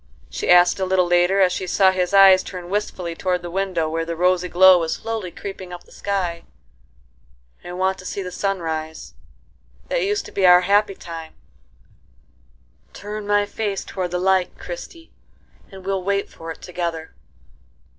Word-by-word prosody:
she - - -4
asked 180 +1 +6
a 190 - 0
little 185 -1 +2
later, 175 +3 +3
as 185 -1 +4
she 185 - -4
saw 190 +1 +4
his 185 -1 -1
eyes 195 -1 +7
turn 180 -2 -8
wistfully 185 -4 -3
toward 180 +1 -2
the 175 - -6
window 185 -3 -1
where 165 +1 -2
the 165 0 -4
rosy 180 +1 +1
glow 185 +1 +7
was 165 -1 -2
slowly 225 -5 -4
creeping 190 0 -8
up 175 0 -9
the - - -23
sky. 180 -4 -3 1.2
"I 175 - -8
want 190 +1 -1
to 185 - -11
see 200 - -4
the 180 - -6
sun 195 0 -2
rise;—that 160 - -7
used 410 +1 -1
to - - -10
be 190 -2 +2
our 180 0 +8
happy 200 +2 +2
time;—turn 65 - -13
my 205 0 +2
face 205 -2 -4
toward 185 -2 -4
the 180 - -2
light, 185 0 +1
Christie, 350 -10 -9 0.6
and 190 -1 -12
we'll 195 -1 -1
wait 200 +1 -1
for 165 - -10
it 165 - -8
together." 170 -3 -5
180 Hz, 165 wpm, -21 LUFS, 170-195 Hz, 1.2 s, our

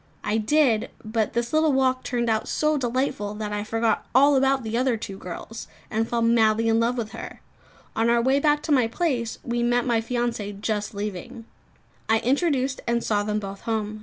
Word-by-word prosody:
I 210 - 0
did; 235 -1 +2 0.2
but 220 -1 -1
this 235 +2 -2
little 310 -1 +3
walk 260 -1 +2
turned 240 -1 -1
out 220 -1 0
so 305 0 +1
delightful, 245 -5 -1
that 210 -1 -4
I 205 0 -2
forgot 225 +1 0
all 280 +2 +6
about 270 -1 +2
the 220 0 -3
other 250 -1 +1
two 200 -2 -7
girls, 200 +5 -8 0.2
and 225 +1 0
fell 235 -1 0
madly 225 -1 +3
in 225 0 +3
love 235 +2 +1
with 220 -3 -3
her! - - -8 0.6
On 225 +1 +2
our 235 0 +4
way 265 +4 +3
back 295 0 +2
to 315 - -3
my 255 -5 +4
place, 240 -4 -1
we 240 0 -2
met 240 0 +2
my 235 -3 +2
fiancée 230 -4 -3
just 210 -1 -2
leaving. 210 +4 -6 0.6
I 225 - +5
introduced 270 0 0
and 235 0 +1
saw 205 -2 +1
them 210 0 -1
both 195 -1 -7
home. 215 -1 -3
235 Hz, 195 wpm, -24 LUFS, 215-255 Hz, 0.6 s, all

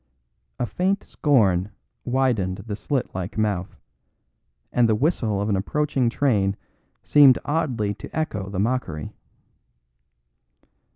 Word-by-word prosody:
A - - -1
faint 190 - -1
scorn 100 - +2 0.4
widened 120 -8 0
the 105 -3 -4
slit 130 +4 -2
like 95 +2 -5
mouth, 100 -4 -1 1.0
and 120 -2 +3
the 110 - +3
whistle 115 - 0
of 100 - -1
an 105 - +1
approaching 135 +5 0
train 105 -7 +1 0.5
seemed 140 -3 +6
oddly 130 -9 -1
to - - -10
echo 105 -12 -2
the 95 - -5
mockery. 100 - -2
110 Hz, 115 wpm, -23 LUFS, 100-135 Hz, 1.0 s, seemed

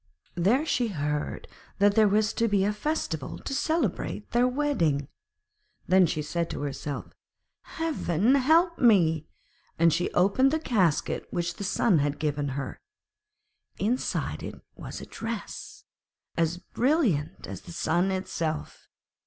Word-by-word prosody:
There 215 - +2
she 250 -6 +1
heard 150 -6 -3 0.3
that 205 0 +4
there 215 0 +5
was 210 +1 +2
to 230 - +1
be 200 -2 +2
a 210 - +1
festival 210 - -3
to - - -6
celebrate 275 - -1
their 240 +2 +4
wedding. 220 - 0 0.8
Then 185 0 +5
she 155 -1 -2
said 170 +2 -2
to - - -5
herself, 145 0 -5 0.5
'Heaven 255 - 0
help 325 +6 +4
me,' 165 - +4 0.5
and 165 -1 +4
she 175 +2 0
opened 200 +9 +4
the 315 - +1
casket 190 - +1
which 170 -1 -2
the - - -5
Sun 195 -2 +2
had 145 0 0
given 145 -1 -1
her; 135 -1 -5 1.0
inside 235 +6 -1
it - - -7 0.2
was - - -7
a - - -7
dress, 225 -1 -6 0.5
as 165 +1 +1
brilliant 210 - 0
as - - -7
the - - -11
Sun 170 +2 +1
itself. 170 -4 -3
190 Hz, 135 wpm, -27 LUFS, 160-245 Hz, 1.0 s, there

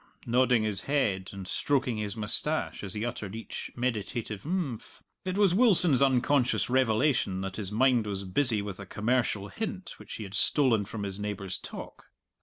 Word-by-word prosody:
nodding 125 -1 +3
his 105 -3 -1
head 100 -10 +1
and 95 -2 -8
stroking 130 -3 0
his 105 0 -3
moustache 110 +9 -2
as 95 -1 -6
he 105 +2 -2
uttered 110 -4 -5
each 115 - -6
meditative 115 -3 -2
"imphm." 155 - -3 0.3
It 185 +1 -2
was 200 -4 +4
Wilson's 180 - +5
unconscious 130 -1 +3
revelation 120 -5 +2
that 95 -1 -5
his 100 -3 -3
mind 120 0 +3
was 100 -1 -2
busy 105 +2 +1
with 100 -2 -6
a 95 - -8
commercial 105 -1 0
hint 195 - -5
which - - -8
he 110 - -6
had 95 -1 -9
stolen 115 -2 +3
from 105 0 -6
his 100 0 -4
neighbour's 100 -3 -3
talk. - - -9
115 Hz, 170 wpm, -29 LUFS, 100-130 Hz, 0.3 s, Wilson's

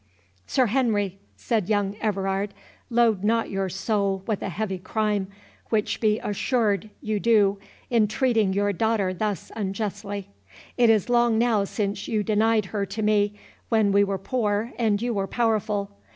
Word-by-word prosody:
"Sir 260 - +3
Henry," 210 -5 0 0.2
said 220 -6 -1
young 205 -2 +1
Everard, 195 -1 -1 0.3
"load 230 -5 +3
not 225 +2 +1
your 195 -1 -1
soul 195 0 -1
with 215 -3 -2
a - - -3
heavy 190 +1 -3
crime, 210 0 -1 0.4
which 215 -2 0
be 215 -1 +3
assured 215 -1 0
you 215 -2 -1
do, 205 -3 +3 0.3
in 225 -3 +4
treating 220 -2 +1
your 205 +1 +1
daughter 210 -2 +1
thus 205 +1 -3
unjustly. 205 -1 -4 0.5
It 240 -2 +4
is 220 -2 +3
long 240 -2 +3
now 225 -3 +2
since 200 -1 -3
you 215 -2 0
denied 215 +1 +2
her 205 -2 0
to 210 +3 -4
me, 210 -1 +2 0.3
when 220 -3 +3
we 200 +1 +5
were 200 -1 -1
poor 215 +1 -1
and 215 -3 +2
you 240 +1 -1
were 195 -2 -1
powerful. 210 -2 0
210 Hz, 155 wpm, -25 LUFS, 200-225 Hz, 0.5 s, we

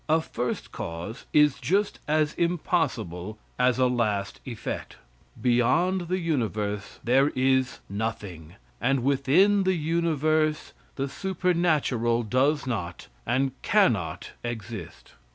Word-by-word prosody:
A 160 +1 +5
first 125 -6 -4
cause 85 +8 -6
is 150 -3 +4
just 195 - 0
as 155 0 +2
impossible 125 - -1 0.2
as 125 0 +3
a 130 - +3
last 110 -5 0
effect. 120 -4 -5 0.4
Beyond 145 +10 +2
the 185 +2 0
universe 110 - -2
there 135 +4 +4
is 130 0 +1
nothing, 100 -6 -5 0.3
and 130 0 +1
within 140 +10 +4
the 190 -1 +2
universe 155 -1 0 0.2
the 135 0 -2
supernatural 155 - +1
does 135 +7 +1
not 100 -9 -4 0.2
and 135 +2 +1
cannot 120 - +1
exist. 115 -5 -7
130 Hz, 110 wpm, -26 LUFS, 115-160 Hz, 0.4 s, A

